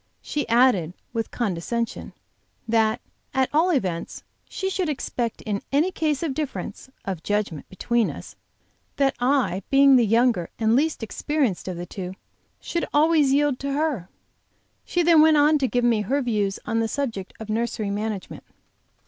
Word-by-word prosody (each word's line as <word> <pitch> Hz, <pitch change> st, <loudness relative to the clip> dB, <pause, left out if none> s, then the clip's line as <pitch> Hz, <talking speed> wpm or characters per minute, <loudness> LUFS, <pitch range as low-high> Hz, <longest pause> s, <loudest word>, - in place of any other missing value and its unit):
She 295 Hz, -5 st, -3 dB
added, 230 Hz, -9 st, +3 dB, 0.2 s
with 225 Hz, -1 st, -2 dB
condescension, 230 Hz, +2 st, -3 dB, 0.5 s
that 225 Hz, +1 st, +2 dB, 0.3 s
at 265 Hz, -1 st, +2 dB
all 325 Hz, +5 st, +4 dB
events 185 Hz, -, -2 dB, 0.3 s
she 385 Hz, -, -3 dB
should 370 Hz, -3 st, -1 dB
expect 245 Hz, -5 st, -3 dB
in 205 Hz, -2 st, -2 dB
any 305 Hz, +7 st, +2 dB
case 310 Hz, -4 st, -1 dB
of 310 Hz, -5 st, -1 dB
difference 260 Hz, -6 st, -5 dB, 0.2 s
(of 190 Hz, -5 st, -4 dB
judgment) 205 Hz, -6 st, -2 dB
between 235 Hz, +4 st, 0 dB
us, -, -, -9 dB, 0.6 s
that 275 Hz, -1 st, +2 dB
I, 250 Hz, -7 st, +1 dB
being 275 Hz, -1 st, +6 dB
the 240 Hz, -, +4 dB
younger 230 Hz, -5 st, +2 dB
and 220 Hz, 0 st, +2 dB
least 300 Hz, -2 st, +1 dB
experienced 260 Hz, -, -1 dB
of 185 Hz, -2 st, -4 dB
the 175 Hz, -, -5 dB
two, 185 Hz, 0 st, -7 dB, 0.4 s
should 340 Hz, -, -3 dB
always 300 Hz, -2 st, +4 dB
yield 285 Hz, -1 st, +2 dB
to 280 Hz, 0 st, -3 dB
her. 280 Hz, -, -1 dB, 0.8 s
She 350 Hz, -, +1 dB
then 330 Hz, -2 st, +6 dB
went 310 Hz, -1 st, +6 dB
on 300 Hz, +1 st, +4 dB
to 265 Hz, -, +1 dB
give 245 Hz, 0 st, 0 dB
me 235 Hz, -3 st, +3 dB
her 265 Hz, +8 st, 0 dB
views 205 Hz, -5 st, 0 dB
on 225 Hz, -1 st, 0 dB
the 225 Hz, -, +1 dB
subject 225 Hz, -7 st, -3 dB
of 220 Hz, -1 st, -6 dB
nursery 220 Hz, -2 st, -1 dB
management. 210 Hz, -1 st, -4 dB
240 Hz, 160 wpm, -24 LUFS, 210-290 Hz, 0.8 s, being